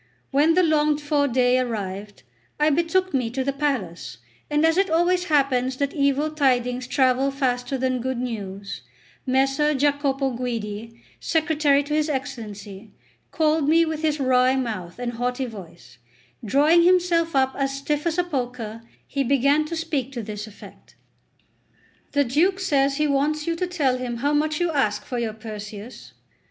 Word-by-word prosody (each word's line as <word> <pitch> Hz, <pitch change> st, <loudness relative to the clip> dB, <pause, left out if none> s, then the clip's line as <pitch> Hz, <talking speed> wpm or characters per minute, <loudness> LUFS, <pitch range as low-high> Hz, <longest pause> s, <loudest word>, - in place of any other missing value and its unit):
When 300 Hz, +4 st, +4 dB
the 365 Hz, -, +4 dB
longed 300 Hz, -2 st, +2 dB
for 290 Hz, -1 st, +1 dB
day 250 Hz, 0 st, +3 dB
arrived, 205 Hz, -, -4 dB, 0.4 s
I 300 Hz, +1 st, +4 dB
betook 345 Hz, +4 st, +1 dB
me 250 Hz, -4 st, 0 dB
to 260 Hz, +3 st, -2 dB
the 275 Hz, +1 st, -1 dB
palace; 210 Hz, -, -3 dB, 0.3 s
and 295 Hz, +1 st, +2 dB
as 325 Hz, 0 st, +3 dB
it 390 Hz, +1 st, +2 dB
always 350 Hz, +2 st, +2 dB
happens 265 Hz, -4 st, +1 dB
that 280 Hz, 0 st, -1 dB
evil 280 Hz, +1 st, +1 dB
tidings 250 Hz, -4 st, +1 dB
travel 260 Hz, +1 st, +2 dB
faster 260 Hz, -1 st, -1 dB
than 255 Hz, -1 st, -1 dB
good 260 Hz, 0 st, -2 dB
news, 200 Hz, -5 st, -5 dB, 0.5 s
Messer 270 Hz, +3 st, +2 dB
Giacopo 280 Hz, -1 st, +1 dB
Guidi, 230 Hz, -2 st, -5 dB, 0.2 s
secretary 310 Hz, -3 st, +2 dB
to 290 Hz, +1 st, -5 dB
his 305 Hz, 0 st, +1 dB
Excellency, 215 Hz, -7 st, -6 dB, 0.4 s
called 310 Hz, -2 st, +1 dB
me 330 Hz, +1 st, +5 dB
with 315 Hz, -1 st, -3 dB
his 305 Hz, -2 st, 0 dB
wry 255 Hz, -1 st, +3 dB
mouth 215 Hz, -9 st, -4 dB
and 245 Hz, -1 st, -3 dB
haughty 245 Hz, +2 st, -2 dB
voice; 170 Hz, -, -12 dB, 0.4 s
drawing 295 Hz, +10 st, +4 dB
himself 345 Hz, -2 st, +3 dB
up 265 Hz, 0 st, +2 dB
as 275 Hz, -1 st, -1 dB
stiff 295 Hz, +3 st, -2 dB
as 330 Hz, 0 st, -1 dB
a 360 Hz, -, +3 dB
poker, 245 Hz, -8 st, -4 dB, 0.2 s
he 280 Hz, -1 st, -2 dB
began 280 Hz, +3 st, +2 dB
to 335 Hz, +2 st, -4 dB
speak 310 Hz, -5 st, -2 dB
to 235 Hz, -3 st, -4 dB
this 210 Hz, 0 st, -6 dB
effect: 205 Hz, -, -15 dB, 1.2 s
"The 285 Hz, 0 st, +3 dB
Duke 330 Hz, +10 st, +1 dB
says 280 Hz, -7 st, +1 dB
he 300 Hz, -, +2 dB
wants 295 Hz, +2 st, 0 dB
you 335 Hz, -, -1 dB
to 360 Hz, +2 st, -2 dB
tell 280 Hz, -8 st, 0 dB
him 245 Hz, -2 st, -4 dB
how 285 Hz, +5 st, 0 dB
much 305 Hz, +1 st, +1 dB
you 350 Hz, -1 st, +1 dB
ask 210 Hz, -8 st, 0 dB
for 245 Hz, -, -3 dB
your 225 Hz, -2 st, -2 dB
Perseus." 215 Hz, +1 st, -9 dB
270 Hz, 165 wpm, -23 LUFS, 240-305 Hz, 1.2 s, me